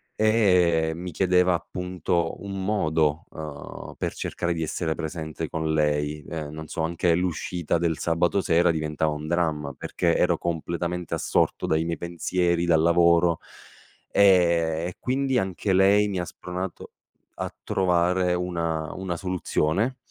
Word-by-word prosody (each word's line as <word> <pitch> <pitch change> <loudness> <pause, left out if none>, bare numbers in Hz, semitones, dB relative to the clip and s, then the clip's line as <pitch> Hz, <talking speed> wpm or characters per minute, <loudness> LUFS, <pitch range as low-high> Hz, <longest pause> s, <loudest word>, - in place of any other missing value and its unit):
e 90 -7 +3
mi 90 +2 -6
chiedeva 90 +1 +3
appunto 90 -1 -2
un 100 -1 -5
modo, 80 -6 +1
uhm, 75 -2 -8
per - - -2
cercare 85 0 -2
di 80 - -2
essere 80 0 -2
presente 80 0 -5
con 80 -1 -1
lei. 75 -1 0
Ehm, 75 -3 -5
non 80 0 -7
so 80 - -3
anche 85 +1 +1
l'uscita 90 -1 -1
del 80 -1 0
sabato 85 +3 +1
sera 85 -2 +3
diventava 80 -1 -1
un 75 +1 -5
dramma, 80 -4 -1
perché - - 0
ero - - +2
completamente 85 +1 -3
assorto - - 0
dai 80 +1 +1
miei 85 0 -2
pensieri, 85 0 0
dal 85 -2 +4
lavoro; 85 0 +4 0.7
ehm, 85 -4 +4
e 90 - -7
quindi 130 0 0
anche 95 -1 -1
lei 100 +2 +5
mi 95 -3 -2
ha 90 - -2
spronato 90 0 -6 0.4
a - - -5
trovare 90 0 +2
una 85 -3 -2
una 95 -3 -4
soluzione, 95 +5 0
85 Hz, 140 wpm, -25 LUFS, 80-90 Hz, 0.7 s, lei